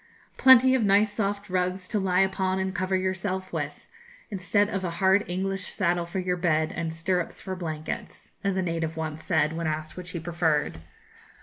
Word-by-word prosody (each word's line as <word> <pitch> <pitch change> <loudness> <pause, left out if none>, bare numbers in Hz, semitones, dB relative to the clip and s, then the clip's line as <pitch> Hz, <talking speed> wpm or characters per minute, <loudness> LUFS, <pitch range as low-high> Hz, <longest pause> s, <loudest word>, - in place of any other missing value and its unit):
'Plenty 260 0 +7
of 260 -3 +2
nice 205 +1 +4
soft 200 -1 -2
rugs 185 0 -1
to 215 - +1
lie 190 -1 +2
upon 190 -1 +1
and 190 0 -1
cover 185 0 0
yourself 185 0 -2
with, 145 -3 -4 0.5
instead 200 +1 +1
of 195 -3 -3
a 180 - -1
hard 190 +2 +4
English 190 +1 -2
saddle 175 -3 0
for 175 - -5
your 180 -1 0
bed 160 -3 +1
and 165 0 -2
stirrups 170 +2 -2
for 190 - -5
blankets,' 160 -3 -6
as 195 -1 0
a 190 - +1
native 165 -2 -2
once 160 0 -4
said, 160 -2 +1
when 165 0 -2
asked 155 0 -3
which 180 -1 -7
he 175 - -4
preferred. 160 - 0
185 Hz, 185 wpm, -27 LUFS, 165-195 Hz, 0.5 s, Plenty